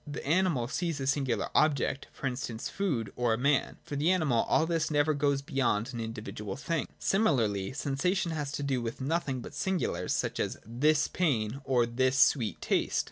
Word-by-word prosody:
The 145 Hz, -, -6 dB
animal 160 Hz, -6 st, +2 dB
sees 165 Hz, +1 st, -2 dB
a 135 Hz, -, -2 dB
singular 135 Hz, -2 st, 0 dB
object, 140 Hz, -3 st, +2 dB
for -, -, -8 dB
instance, 125 Hz, -3 st, -3 dB
its -, -, -2 dB
food, 135 Hz, -, -2 dB
or 120 Hz, -2 st, +1 dB
a -, -, -5 dB
man. 140 Hz, +3 st, +1 dB
For 145 Hz, -, -6 dB
the 150 Hz, +4 st, +2 dB
animal 155 Hz, -11 st, +2 dB
all 160 Hz, -, +4 dB
this 165 Hz, -1 st, 0 dB
never 150 Hz, 0 st, +2 dB
goes 140 Hz, -1 st, +1 dB
beyond 125 Hz, -3 st, 0 dB
an 120 Hz, -, -4 dB
individual 110 Hz, -2 st, -5 dB
thing. 160 Hz, +2 st, -2 dB
Similarly, 115 Hz, -, +1 dB
sensation 165 Hz, +7 st, 0 dB
has 145 Hz, -3 st, -3 dB
to 145 Hz, -, -3 dB
do 135 Hz, -3 st, 0 dB
with 115 Hz, 0 st, -4 dB
nothing 135 Hz, -2 st, -1 dB
but -, -, -9 dB
singulars, 190 Hz, -2 st, -1 dB
such -, -, -2 dB
as -, -, -1 dB
this 145 Hz, +7 st, +2 dB
pain 135 Hz, -7 st, 0 dB
or 125 Hz, -3 st, +3 dB
this 130 Hz, +3 st, +1 dB
sweet 120 Hz, -, +3 dB
taste. -, -, +1 dB
140 Hz, 190 wpm, -30 LUFS, 120-155 Hz, -, all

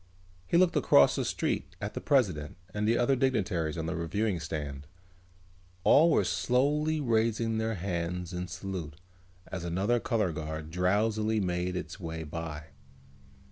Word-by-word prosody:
He -, -, +3 dB
looked 180 Hz, -1 st, +4 dB
across 70 Hz, -, +5 dB
the -, -, 0 dB
street -, -, -2 dB
at -, -, -4 dB
the -, -, -5 dB
president 90 Hz, -, +1 dB, 0.2 s
and 105 Hz, 0 st, -1 dB
the 115 Hz, +1 st, +3 dB
other 125 Hz, +3 st, +3 dB
dignitaries 100 Hz, -, 0 dB
on 80 Hz, -, -2 dB
the 85 Hz, +3 st, -2 dB
reviewing 90 Hz, +4 st, -1 dB
stand. 75 Hz, -2 st, -5 dB, 1.0 s
All 160 Hz, -, +6 dB
were 160 Hz, -, +3 dB
slowly 150 Hz, +5 st, +1 dB
raising 115 Hz, -3 st, +1 dB
their 110 Hz, 0 st, -1 dB
hands 90 Hz, -1 st, -3 dB
in 90 Hz, 0 st, -3 dB
salute 90 Hz, -3 st, -6 dB, 0.5 s
as 90 Hz, -2 st, -5 dB
another 95 Hz, +8 st, +1 dB
color 110 Hz, -7 st, 0 dB
guard 80 Hz, 0 st, -5 dB
drowsily 105 Hz, +5 st, +1 dB
made 90 Hz, -1 st, -1 dB
its 80 Hz, 0 st, -5 dB
way 80 Hz, -2 st, -5 dB
by. 80 Hz, 0 st, -6 dB
90 Hz, 145 wpm, -29 LUFS, 80-115 Hz, 1.0 s, All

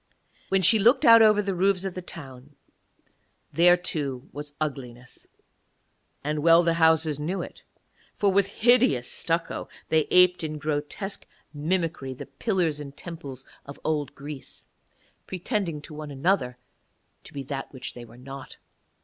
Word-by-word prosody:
When 190 Hz, 0 st, +2 dB
she 220 Hz, +5 st, +6 dB
looked 250 Hz, +7 st, +4 dB
out 230 Hz, -1 st, +9 dB
over 210 Hz, -1 st, +5 dB
the 195 Hz, -1 st, -1 dB
roofs 190 Hz, +1 st, +2 dB
of 190 Hz, -, -3 dB
the 185 Hz, -, -6 dB
town, 140 Hz, -5 st, -10 dB, 1.0 s
there 175 Hz, +1 st, +6 dB
too 140 Hz, -7 st, -3 dB
was 145 Hz, 0 st, -7 dB
ugliness; 130 Hz, -4 st, -6 dB, 1.0 s
and 150 Hz, +1 st, -1 dB
well 165 Hz, +2 st, +6 dB
the 170 Hz, 0 st, +2 dB
houses 160 Hz, -2 st, +3 dB
knew 175 Hz, +6 st, -2 dB
it, -, -, -11 dB, 0.5 s
for 200 Hz, -1 st, +2 dB
with 195 Hz, 0 st, +3 dB, 0.2 s
hideous 185 Hz, -, +4 dB
stucco 165 Hz, 0 st, -3 dB, 0.2 s
they 160 Hz, -1 st, +2 dB
aped 180 Hz, -1 st, +5 dB
in 155 Hz, -1 st, -3 dB
grotesque 150 Hz, +7 st, -4 dB, 0.3 s
mimicry 155 Hz, -3 st, -2 dB
the -, -, -8 dB
pillars 165 Hz, +1 st, -1 dB
and 140 Hz, -1 st, -9 dB
temples 140 Hz, -7 st, -8 dB, 0.2 s
of 140 Hz, -, -11 dB
old 150 Hz, -3 st, -2 dB
Greece, 145 Hz, -1 st, -9 dB, 0.6 s
pretending 185 Hz, -, -2 dB
to 155 Hz, -, -10 dB
one 150 Hz, 0 st, -7 dB
another 135 Hz, -3 st, 0 dB, 0.7 s
to -, -, -13 dB
be 140 Hz, -, -6 dB
that 135 Hz, 0 st, -6 dB
which 130 Hz, -2 st, -7 dB
they 120 Hz, -, -9 dB
were 120 Hz, 0 st, -15 dB
not. 135 Hz, +1 st, -10 dB
155 Hz, 150 wpm, -26 LUFS, 140-185 Hz, 1.0 s, out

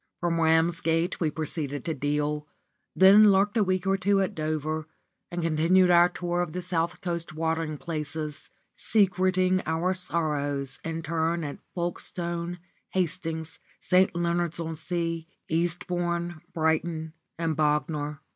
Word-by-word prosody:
From 170 Hz, -1 st, 0 dB
Ramsgate 165 Hz, +1 st, +2 dB
we 160 Hz, -, +1 dB
proceeded 150 Hz, -3 st, -3 dB
to 160 Hz, -, -1 dB
Deal, 150 Hz, +1 st, -1 dB, 0.5 s
then 200 Hz, +3 st, +8 dB
lurked 200 Hz, +2 st, +3 dB
a 220 Hz, -, +4 dB
week 185 Hz, -1 st, 0 dB
or 195 Hz, 0 st, +2 dB
two 195 Hz, +1 st, +2 dB
at 190 Hz, -2 st, 0 dB
Dover, 155 Hz, 0 st, -2 dB, 0.4 s
and 175 Hz, -1 st, -3 dB
continued 165 Hz, +3 st, +4 dB
our 175 Hz, 0 st, +6 dB
tour 175 Hz, +1 st, -2 dB
of 165 Hz, -3 st, -3 dB
the 180 Hz, -, -3 dB
south 170 Hz, 0 st, -1 dB
coast 170 Hz, -3 st, -4 dB
watering 160 Hz, -1 st, -1 dB
places, 155 Hz, -2 st, -4 dB, 0.2 s
secreting 185 Hz, -2 st, +2 dB
our 165 Hz, +3 st, +1 dB
sorrows 145 Hz, -6 st, -1 dB
in 165 Hz, 0 st, -4 dB
turn 165 Hz, +1 st, 0 dB
at 145 Hz, -1 st, -5 dB, 0.2 s
Folkestone, 175 Hz, 0 st, -2 dB, 0.3 s
Hastings, 165 Hz, -3 st, -2 dB, 0.2 s
St. 185 Hz, 0 st, +3 dB
Leonard's 170 Hz, -1 st, 0 dB
on 165 Hz, -1 st, -3 dB
Sea, 165 Hz, 0 st, -3 dB, 0.2 s
Eastbourne, 175 Hz, 0 st, -1 dB
Brighton, 160 Hz, 0 st, -1 dB, 0.2 s
and 165 Hz, -1 st, -1 dB
Bognor. 150 Hz, 0 st, 0 dB
165 Hz, 130 wpm, -27 LUFS, 155-175 Hz, 0.5 s, then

